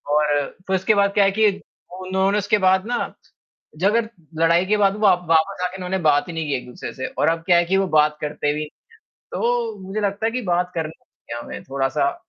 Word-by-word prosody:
और 145 Hz, -2 st, +2 dB, 0.2 s
फ़िर 190 Hz, -, +1 dB
उसके 190 Hz, +3 st, +2 dB
बाद 200 Hz, 0 st, +2 dB
क्या 205 Hz, -, +4 dB
है 195 Hz, -, +3 dB
कि 215 Hz, -1 st, +6 dB, 0.5 s
उन्होंने 190 Hz, +2 st, +1 dB
उसके 205 Hz, +1 st, +2 dB
बाद 190 Hz, +2 st, +3 dB
ना 245 Hz, -, -2 dB, 0.6 s
झगड़ 210 Hz, +7 st, +2 dB, 0.4 s
लड़ाई 170 Hz, +2 st, +4 dB
के 210 Hz, +2 st, +2 dB
बाद 200 Hz, -1 st, +3 dB
व 210 Hz, 0 st, +2 dB, 0.2 s
वापस 165 Hz, +4 st, +2 dB
आके 180 Hz, +1 st, -3 dB
इन्होंने 185 Hz, +1 st, -3 dB
बात 145 Hz, +4 st, +3 dB
ही -, -, -5 dB
नहीं 160 Hz, -1 st, -3 dB
की 140 Hz, -, 0 dB
एक-दूसरे 125 Hz, 0 st, -8 dB
से 130 Hz, -, -4 dB
और -, -, 0 dB
अब 165 Hz, 0 st, 0 dB
क्या 175 Hz, -2 st, +5 dB
है 175 Hz, -, +4 dB
कि 190 Hz, +3 st, +1 dB
वो 195 Hz, -, +2 dB
बात 150 Hz, 0 st, +3 dB
करते 145 Hz, -1 st, -1 dB
भी 150 Hz, -, -3 dB, 0.7 s
तो 235 Hz, -3 st, -1 dB
मुझे 200 Hz, +3 st, -3 dB
लगता 205 Hz, +2 st, -1 dB
है -, -, +1 dB
कि 250 Hz, 0 st, -2 dB
बात 180 Hz, -1 st, 0 dB
करना 160 Hz, -1 st, -5 dB, 0.3 s
चाहिए 120 Hz, 0 st, -4 dB
उन्हे -, -, -7 dB
थोड़ा-सा 140 Hz, +1 st, 0 dB
185 Hz, 215 wpm, -22 LUFS, 155-200 Hz, 0.7 s, कि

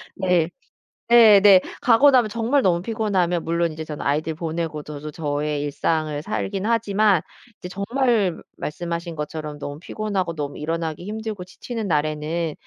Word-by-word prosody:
네. 180 Hz, -3 st, +1 dB, 0.6 s
네네. 205 Hz, -5 st, +8 dB, 0.2 s
가고 250 Hz, +4 st, +6 dB
나면 245 Hz, -4 st, +4 dB
정말 235 Hz, +6 st, +1 dB
너무 175 Hz, -2 st, +1 dB
피곤하면 190 Hz, -6 st, 0 dB
물론 170 Hz, 0 st, 0 dB
이제 160 Hz, 0 st, -6 dB
저는 150 Hz, -1 st, -7 dB
아이들 155 Hz, +3 st, 0 dB
보내고 160 Hz, -2 st, -4 dB
저도 150 Hz, 0 st, -7 dB
저의 150 Hz, -1 st, -2 dB
일상을 150 Hz, 0 st, -1 dB
살긴 200 Hz, +1 st, -3 dB
하지만 210 Hz, -5 st, +2 dB, 0.4 s
이제 180 Hz, -, -8 dB
정말 205 Hz, -1 st, 0 dB, 0.2 s
말씀하신 170 Hz, +1 st, -4 dB
것처럼 150 Hz, 0 st, -5 dB
너무 145 Hz, +1 st, -7 dB
피곤하고 195 Hz, -3 st, -3 dB
너무 145 Hz, -2 st, -5 dB
일어나기 165 Hz, +2 st, -3 dB
힘들고 215 Hz, -3 st, -5 dB
지치는 225 Hz, +3 st, -6 dB
날에는 155 Hz, +1 st, -1 dB
170 Hz, 335 characters per minute, -22 LUFS, 155-210 Hz, 0.6 s, 네네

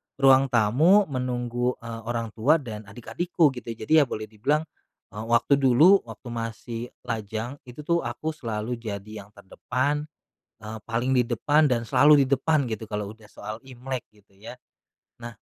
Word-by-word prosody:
ruang 135 Hz, 0 st, +5 dB
tamu 145 Hz, -, +4 dB
menunggu, 125 Hz, -1 st, -2 dB
eee, 115 Hz, -1 st, -7 dB
orang 115 Hz, -1 st, -3 dB
tua 140 Hz, +9 st, +4 dB
dan 110 Hz, -4 st, -8 dB
adik-adikku 155 Hz, -, 0 dB
gitu. 115 Hz, -1 st, -6 dB
Jadi 155 Hz, +9 st, +2 dB
ya 145 Hz, -, +4 dB
boleh 110 Hz, -, -5 dB
dibilang, 140 Hz, +9 st, 0 dB, 0.5 s
eee, 110 Hz, +2 st, -7 dB
waktu 120 Hz, +4 st, +3 dB
dulu, 150 Hz, +10 st, +6 dB
waktu 110 Hz, +2 st, -11 dB
masih 115 Hz, 0 st, -5 dB, 0.2 s
lajang 110 Hz, +4 st, -4 dB
itu 125 Hz, +5 st, -9 dB
tuh 170 Hz, +2 st, +1 dB
aku 120 Hz, +7 st, -3 dB
selalu 115 Hz, -4 st, -4 dB
jadi 105 Hz, -1 st, -7 dB
yang -, -, -22 dB
terdepan, 135 Hz, +9 st, -2 dB, 0.5 s
eee, 110 Hz, +1 st, -7 dB
paling 120 Hz, +3 st, 0 dB
di 125 Hz, -, +4 dB
depan 145 Hz, +6 st, +2 dB
dan 125 Hz, -4 st, +1 dB
selalu 145 Hz, 0 st, +6 dB
di 140 Hz, -, +3 dB
depan 140 Hz, -3 st, +1 dB
gitu 110 Hz, 0 st, -4 dB
kalau 105 Hz, -1 st, -4 dB
udah 110 Hz, -1 st, -19 dB
soal 105 Hz, +1 st, -7 dB
Imlek 130 Hz, -1 st, -6 dB
gitu 100 Hz, -2 st, -27 dB
ya, 110 Hz, +4 st, -9 dB, 0.7 s
nah 120 Hz, 0 st, -6 dB
120 Hz, 165 wpm, -25 LUFS, 110-140 Hz, 0.7 s, dulu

